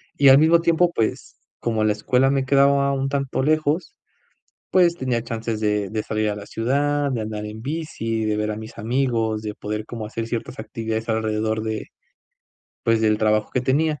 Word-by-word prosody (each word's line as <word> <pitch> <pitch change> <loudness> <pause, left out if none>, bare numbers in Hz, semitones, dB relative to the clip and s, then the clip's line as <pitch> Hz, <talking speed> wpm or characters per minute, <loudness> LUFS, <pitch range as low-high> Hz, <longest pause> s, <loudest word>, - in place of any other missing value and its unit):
Y 140 - +4
al 135 - +9
mismo 165 +2 +5
tiempo, 170 +1 +3
pues, 110 - -2 0.2
como 110 -2 0
la 110 - +3
escuela 125 +5 +2
me 135 -1 +1
quedaba 140 0 +4
un 135 0 -1
tanto 140 -2 -1
lejos, 155 - 0 0.8
pues, 175 -2 +4
tenía 125 -6 -1
chances 115 -1 -3
de 105 -2 0
de 110 -1 -2
salir 110 0 -1
a 105 - -2
la 105 0 -8
ciudad, 145 +4 0
de 115 -3 -2
andar 105 -1 -4
en 105 +1 -7
bici, 120 -7 -3
de 105 0 0
ver 105 0 -1
a 105 - -4
mis 110 0 -9
amigos, 115 -2 0
de 105 -1 -4
poder 105 +1 -4
como 115 -2 -6
hacer 115 +1 -4
ciertas 115 +1 -5
actividades 110 0 -4
alrededor 110 0 0
de, 110 -1 -3 1.0
pues, 115 -1 +2
del 110 -1 +3
trabajo 110 -1 +1
que 125 - +1
tenía. 150 +3 +1
115 Hz, 190 wpm, -22 LUFS, 110-140 Hz, 1.0 s, al